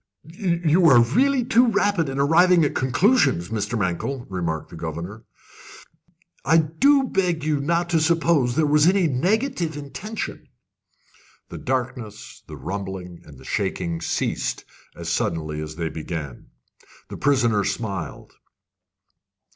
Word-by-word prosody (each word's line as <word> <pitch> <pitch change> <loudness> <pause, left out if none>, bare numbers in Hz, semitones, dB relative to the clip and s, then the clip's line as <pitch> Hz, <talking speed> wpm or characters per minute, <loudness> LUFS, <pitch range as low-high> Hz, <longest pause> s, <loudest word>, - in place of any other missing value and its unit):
"You 170 0 0 0.3
really 270 - +3
are - - -8
too 245 0 +4
rapid 205 -7 +1
in 135 - -4
arriving 170 +3 +4
at - - -1
conclusions, 130 - +2
Mr. 115 +2 -2
Mankell," 105 +7 -2
remarked 85 -4 -3
the - - -9
governor. 85 +7 -6 1.2
"I 165 - +4
do 260 - +3
beg 180 - -1
you 155 -1 +1
will - - -3
not 170 +3 0
suppose 160 -5 +2
there 155 0 +2
was 150 +1 +4
any 190 0 +3
negative 175 - 0
intention." 155 +3 -6 1.0
The - - -8
darkness, 120 -4 -4
the 75 - -9
rumbling, 95 +2 -6
and 75 -3 -14
the 65 - -15
shaking 85 -1 -2
ceased - - -2 0.3
as 85 -1 -8
suddenly 80 -2 -2
as 75 0 -7
they 80 -1 -3
began. 75 -4 -6 0.6
The - - -7
prisoner 120 -7 +2
smiled. 100 -3 -4
140 Hz, 130 wpm, -23 LUFS, -, 1.2 s, too